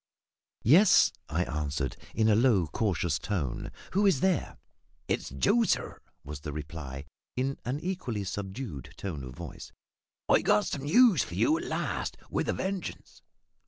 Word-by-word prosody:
"Yes," 170 - +6 0.2
I 80 +3 +1
answered, 75 -4 -2 0.2
in 110 -1 +3
a 110 - +5
low 110 -5 +4
cautious 85 -1 0
tone; 75 -12 -3 0.2
"who 200 +2 +4
is 150 -9 +3
there?" 185 -5 +1 0.5
"It's - - -1
Joe, 135 - +2
sir," 225 - 0 0.2
was 75 0 -7
the 75 +1 -6
reply, 75 -2 -6 0.3
in 135 +2 -1
an 130 +5 -2
equally 155 - -3
subdued 95 - -6
tone 80 -9 -5
of 65 -1 -8
voice. - - -8 0.6
"I've - - +4
got 105 - +4
some 140 -1 -4
news 210 - +6
for - - -8
you 310 - +3
at - - -6
last, - - -2
with - - -1
a - - +2
vengeance!" 190 -2 -5
105 Hz, 155 wpm, -29 LUFS, -, 0.6 s, Yes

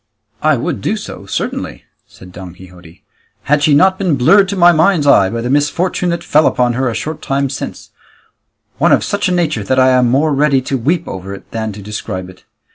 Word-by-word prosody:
"I - - +2
would - - -3
do - - -1
so - - -9
certainly," - - -4 0.2
said 90 -1 -15
Don 90 -1 -10
Quixote, 90 -2 -16 0.4
"had 150 +1 +1
she 150 -1 +3
not 185 +5 +3
been 180 -6 +1
blurred 180 +10 +4
to 200 - -3
my 175 -2 +5
mind's 165 -1 +2
eye 100 -9 +4
by 115 +2 -4
the 120 - -3
misfortune 170 +5 0
that 170 0 -3
fell 155 -2 +3
upon 125 -1 +1
her 130 +1 -1
a 115 - -4
short 155 0 -5
time 135 0 -2
since, 135 - -7 0.9
one - - +3
of - - +2
such 205 -1 -1
a - - -1
nature 160 - -1
that 130 +6 -1
I 130 0 +4
am 125 -1 +3
more 145 +4 +1
ready 140 -1 +2
to 135 - -3
weep 160 +7 -1
over 95 +1 -7
it - - -16
than 110 -1 -4
to 100 0 -10
describe 95 -3 -6
it. 90 - -22
135 Hz, 215 wpm, -15 LUFS, 105-160 Hz, 0.9 s, my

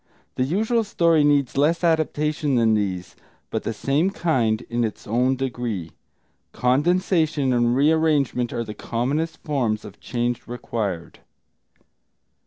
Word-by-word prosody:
The 130 - 0
usual 220 - +1
story 170 -6 +3
needs 145 -3 +2
less 165 +4 +2
adaptation 155 -3 +1
than 115 -2 +3
these, 95 -4 -2 0.4
but - - -1
the - - -3
same 140 - +1
kind, 125 - 0
in 120 +1 -1
its 110 - -4
own 125 +4 +1
degree. 120 -9 -3 0.6
Condensation 150 +1 +2
and 120 0 +2
rearrangement 145 -4 +2
are 115 - -2
the 105 - -7
commonest 145 +10 -2
forms 120 -8 -1
of - - -11
change 120 0 -2
required. 105 -8 -4
130 Hz, 125 wpm, -23 LUFS, 115-155 Hz, 0.6 s, story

